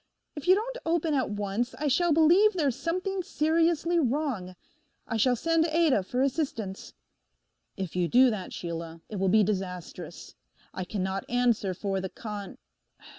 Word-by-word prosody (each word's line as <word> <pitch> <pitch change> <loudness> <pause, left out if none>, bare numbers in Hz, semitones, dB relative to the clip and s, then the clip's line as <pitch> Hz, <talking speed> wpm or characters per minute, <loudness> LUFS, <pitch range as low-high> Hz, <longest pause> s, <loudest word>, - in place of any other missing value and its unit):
If 295 +3 -7
you 370 - +7
don't - - -3
open 325 -1 0
at 265 -3 +1
once 205 +4 -2
I 300 - -2
shall 340 +5 +2
believe 340 +8 +5
there's 290 -9 0
something 365 +7 -2
seriously 335 0 +1
wrong: 255 - -1 0.5
I 225 - -3
shall 250 +3 +3
send 330 +5 +2
Ada 315 -8 +3
for 250 +8 -1
assistance.' 250 -9 -3 0.8
'If 190 -4 -5
you 180 -1 +1
do 250 +5 +5
that, 200 -4 -5
Sheila, 165 -1 -6
it 210 - -5
will 190 0 +1
be 215 +2 +5
disastrous. 185 -3 -5 0.4
I 185 - -4
cannot 190 0 -3
answer 235 -6 +1
for 195 0 -2
the 190 - -4
con—. 210 -1 -7
250 Hz, 155 wpm, -28 LUFS, 195-325 Hz, 0.8 s, you